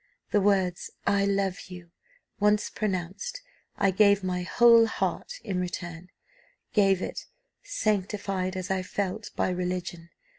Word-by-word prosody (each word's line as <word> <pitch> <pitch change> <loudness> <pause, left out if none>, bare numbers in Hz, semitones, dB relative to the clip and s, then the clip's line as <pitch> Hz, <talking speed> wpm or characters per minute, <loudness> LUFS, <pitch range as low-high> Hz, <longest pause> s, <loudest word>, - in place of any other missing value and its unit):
The 205 - +3
words 190 -3 +1 0.2
'I 200 0 +3
love 195 -1 0
you' 175 -2 -11 0.5
once 210 +1 +2
pronounced, 200 - -3 0.4
I 195 -1 +3
gave 200 0 +4
my 180 -1 -1
whole 230 +4 +6
heart 480 - -2
in 190 -4 -2
return, 175 -1 -5 0.6
gave 195 -3 +3
it, - - -5 0.3
sanctified, 195 - -1
as 185 0 -4
I 190 -1 +1
felt, 200 +2 -3
by - - +1
religion. 180 -1 -3
190 Hz, 125 wpm, -27 LUFS, 180-205 Hz, 0.6 s, whole